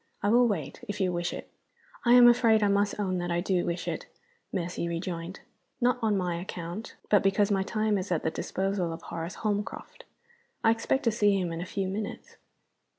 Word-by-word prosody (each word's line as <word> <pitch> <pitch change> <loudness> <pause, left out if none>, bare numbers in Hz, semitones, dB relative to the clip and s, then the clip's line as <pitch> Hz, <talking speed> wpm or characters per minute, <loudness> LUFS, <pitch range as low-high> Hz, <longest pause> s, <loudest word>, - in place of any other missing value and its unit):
I 205 - +3
will 240 +2 +5
wait, 165 - -3
if 205 0 -4
you 185 -2 +1
wish 175 0 -1
it." - - -7 0.6
"I 240 - +6
am 245 -1 +9
afraid 230 -3 +5
I - - +4
must 200 +1 +1
own 185 -3 0
that 175 0 -3
I 170 0 +1
do 180 0 +1
wish 170 0 -3
it," - - -3 0.4
Mercy 175 -1 -2
rejoined. 170 +1 -4 0.4
"Not 250 0 +2
on 215 -3 +2
my 180 -2 -1
account 180 +3 -6 0.2
but 205 - +6
because 195 +1 +2
my 195 -1 +2
time 215 0 0
is 185 +1 -5
at 165 - 0
the 160 - 0
disposal 190 -2 -2
of 165 - -9
Horace 165 +2 -5
Holmcroft. 205 -1 -3 0.6
I 225 - +6
expect 230 +4 0
to 230 - +3
see 205 -2 +3
him 175 -2 -2
in 165 - -4
a 180 - -5
few 195 -2 -2
minutes." 200 +2 -5
195 Hz, 205 wpm, -28 LUFS, 175-215 Hz, 0.6 s, am